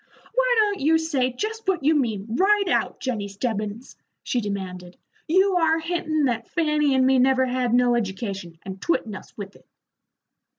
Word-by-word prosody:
"Why - - +2
don't 415 -2 +2
you 315 +4 +3
say 285 -6 0
jest 440 - -5
what 365 -6 0
you 305 +3 +4
mean, 225 -9 0
right 395 - +2
out, - - 0
Jennie 225 -6 -3
Stebbins?" 215 +2 -4 0.3
she 245 - -1
demanded. 185 -3 -6 0.3
"You 375 +3 +3
are 325 -1 +3
hintin' 320 -2 -1
that 235 -3 -1
Fanny 300 -4 +1
and 260 0 +3
me 265 0 +4
never 260 0 +3
had 250 -1 -1
no 245 0 +4
education, 195 -5 -3
and 190 0 -8
twittin' 225 -10 -1
us 190 - -11
with 200 -1 -8
it." - - -21
260 Hz, 170 wpm, -24 LUFS, 210-325 Hz, 0.3 s, you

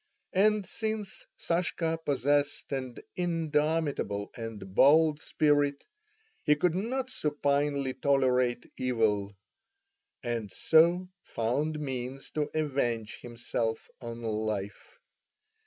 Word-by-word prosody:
And 210 +1 +3
since 215 -2 -4
Sashka 170 -1 0
possessed 145 0 +1
an 130 -3 -3 0.2
indomitable 155 - 0
and 110 -5 -7
bold 150 +5 +5
spirit, 145 -2 +2 0.6
he 150 - +4
could 160 +3 +2
not 255 +7 -2
supinely 145 - 0
tolerate 130 -3 +2
evil, 105 -5 +1 0.9
and 115 -4 -3
so 170 +3 +4
found 145 +7 -1
means 130 -1 -5
to 150 -1 -1
avenge 120 -8 -1
himself 115 -1 -3
on 115 -1 -6
life. 110 - -3
140 Hz, 90 wpm, -29 LUFS, 120-160 Hz, 0.9 s, bold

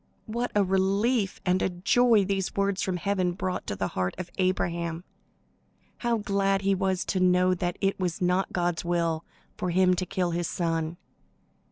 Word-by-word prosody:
What 235 +3 -2
a 205 - +4
relief 195 +3 +1
and 185 0 +2
a - - +1
joy 205 +4 +3
these 195 -1 -2
words 200 -1 0
from 185 -2 -1
heaven 185 -1 0
brought 185 0 -3
to 100 - -2
the 95 -1 -2
heart 90 0 -2
of 175 -1 -6
Abraham! 170 -2 -1 0.9
How 235 -1 0
glad 195 -1 0
he 195 0 +3
was 190 -1 0
to 190 - -1
know 180 0 +4
that 175 -1 -2
it 195 0 +1
was 180 -3 -1
not 180 +1 +1
God's 175 -2 -1
will 170 -2 0 0.3
for 180 - -2
him 185 +1 +4
to 185 +1 -1
kill 185 -2 -1
his 170 0 -1
son! 165 -1 -2
185 Hz, 175 wpm, -27 LUFS, 175-195 Hz, 0.9 s, a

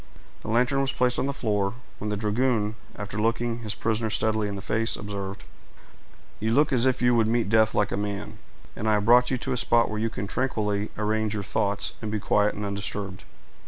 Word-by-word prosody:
The - - -11
lantern 125 +5 +2
was 135 0 +1
placed 125 -2 +1
on 135 - 0
the - - 0
floor, 105 -5 -1 0.2
when 105 - -3
the 105 - -1
dragoon, 110 0 +1 0.2
after 100 +1 -5
looking 115 +1 0
his 110 -2 -3
prisoner 110 0 0
steadily 110 -1 +1
in 100 - -4
the 100 - -6
face, 115 +1 +1
observed,— 100 -1 -6 1.0
"You 110 +2 0
look 145 -1 +3
as 125 0 +4
if 130 -1 +1
you 120 0 +5
would 115 -2 +3
meet 115 -1 +1
death 110 0 +3
like 105 -1 +1
a - - -1
man; 100 0 -4 0.4
and 110 - -1
I - - +4
have 105 -1 +1
brought 125 +2 +6
you 130 - 0
to - - -2
a - - -1
spot 115 -1 +3
where 105 - -2
you 115 +1 0
can 100 -3 -5
tranquilly 105 -3 -1
arrange 110 0 0
your 100 - -3
thoughts, 100 0 -1
and 110 - -4
be 105 0 -1
quiet 105 +1 +2
and 105 - -4
undisturbed." 100 -1 -4
110 Hz, 220 wpm, -26 LUFS, 105-120 Hz, 1.0 s, brought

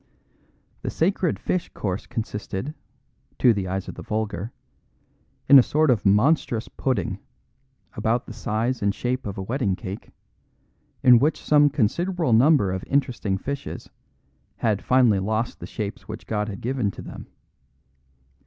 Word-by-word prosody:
The - - -3
sacred 175 0 +1
fish 180 - -2
course 95 -1 -3
consisted 105 +3 -4 0.6
(to 120 - +5
the 100 -3 -3
eyes 95 +1 -3
of - - -6
the - - -9
vulgar) 110 -1 -3 1.0
in 140 0 +10
a - - +8
sort 150 +3 +2
of 105 -4 +1
monstrous 115 +2 +2
pudding, 130 -2 -2 0.7
about 115 +1 0
the - - -9
size 115 +3 -2
and 100 0 +1
shape 125 -1 -2
of 100 - -5
a 95 - -3
wedding 110 -3 0
cake, 95 +2 -7 0.9
in 125 -2 +8
which 150 +5 +1
some 145 -1 +5
considerable 160 - 0
number 125 -4 +5
of 95 -1 -3
interesting 125 -8 0
fishes 140 +7 -6 0.6
had 105 -3 0
finally 125 -6 +4
lost 110 +4 -2
the - - -7
shapes 105 -3 -5
which 110 - -7
God 105 -1 -2
had 100 - -7
given 125 -3 0
to - - -9
them. - - -9
115 Hz, 145 wpm, -24 LUFS, 105-135 Hz, 1.0 s, in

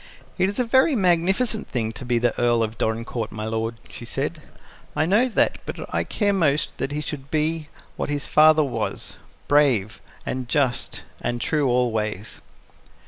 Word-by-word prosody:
"It 185 +1 +3
is 200 - -5
a 250 - +3
very 260 +5 +4
magnificent 195 +4 +2
thing 115 -3 -2
to 115 - -7
be 120 -1 +1
the 120 0 +2
Earl 120 -1 +3
of 110 0 -3
Dorincourt, 115 0 -2
my 110 +1 -5
lord," 115 +1 -2
she - - -9
said. - - -3 0.5
"I 155 - +2
know 215 +9 +3
that, 225 - +1
but - - -6 0.2
I - - +1
care 205 -2 +1
most 155 -6 +1
that 135 - -2
he 150 +1 -2
should 140 -2 -6
be 155 0 -1 0.3
what - - -2
his 145 -2 -2
father 155 0 +6
was 135 - -3 0.3
brave 130 -8 +3 0.2
and 130 -1 -4
just 135 -4 0 0.2
and 120 0 -2
true 150 +3 +1
always." 110 -5 -1
140 Hz, 170 wpm, -23 LUFS, 115-165 Hz, 0.5 s, father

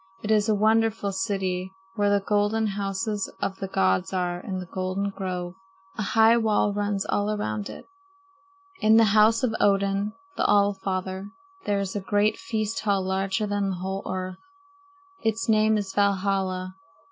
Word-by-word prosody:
"It 215 - -1
is 215 0 +3
a 215 - +4
wonderful 220 -1 +2
city 190 -1 -2 0.2
where 205 0 +1
the 200 -1 +1
golden 210 +2 +1
houses 200 0 -2
of 195 -1 -2
the 195 - -4
gods 95 - +1
are 180 -1 -1
in 185 +1 -5
the 185 - -5
golden 185 +2 -2
grove. 180 -2 -4 0.4
A - - -4
high 225 +3 +4
wall 215 -2 +2
runs 205 -1 -1
all 205 0 0
around 110 - -2
it. - - -10 0.9
In 220 +1 +5
the 225 - +7
house 220 +3 +5
of 240 -3 +1
Odin, 200 +1 +2 0.2
the - - +1
All 205 0 +4
father, 190 0 -4 0.4
there 205 - +2
is 195 0 -3
a 205 - -1
great 205 +2 +1
feast 225 -1 -2
hall 200 -2 +1
larger 190 +2 -1
than 205 -1 -1
the 190 - -2
whole 190 +2 -4
earth. 185 0 -4 0.8
Its 225 +1 -1
name 215 0 +4
is 195 -2 -4
Valhalla. 190 -2 0
200 Hz, 165 wpm, -25 LUFS, 190-210 Hz, 0.9 s, the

